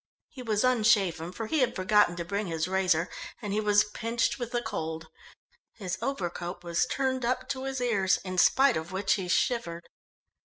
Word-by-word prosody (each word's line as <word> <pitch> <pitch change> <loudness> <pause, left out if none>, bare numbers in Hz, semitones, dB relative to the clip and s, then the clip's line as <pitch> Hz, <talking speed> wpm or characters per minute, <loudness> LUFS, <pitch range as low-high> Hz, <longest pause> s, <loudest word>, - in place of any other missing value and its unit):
He 260 - -10
was 220 -3 0
unshaven 200 -9 +2
for 225 +5 -5
he 310 +8 0
had 255 - +1
forgotten 185 -1 +3
to 170 -1 -5
bring 200 +3 -2
his 165 -1 -2
razor 185 -3 +1 0.3
and 210 -4 -4
he 210 - +1
was 205 0 +4
pinched 230 +4 -2
with 240 -2 -4
the 240 - 0
cold. 160 -7 -4 0.7
His 185 -3 -5
overcoat 175 -8 -4
was 170 +7 0
turned 260 -1 -1
up 245 +2 -1
to 265 -1 -3
his 270 -1 -3
ears, 205 -6 +2
in 185 -1 -2
spite 270 +5 +5
of 160 +3 -6
which 190 +1 +1
he 195 -5 -2
shivered. 180 -2 -1
205 Hz, 180 wpm, -28 LUFS, 175-240 Hz, 0.7 s, spite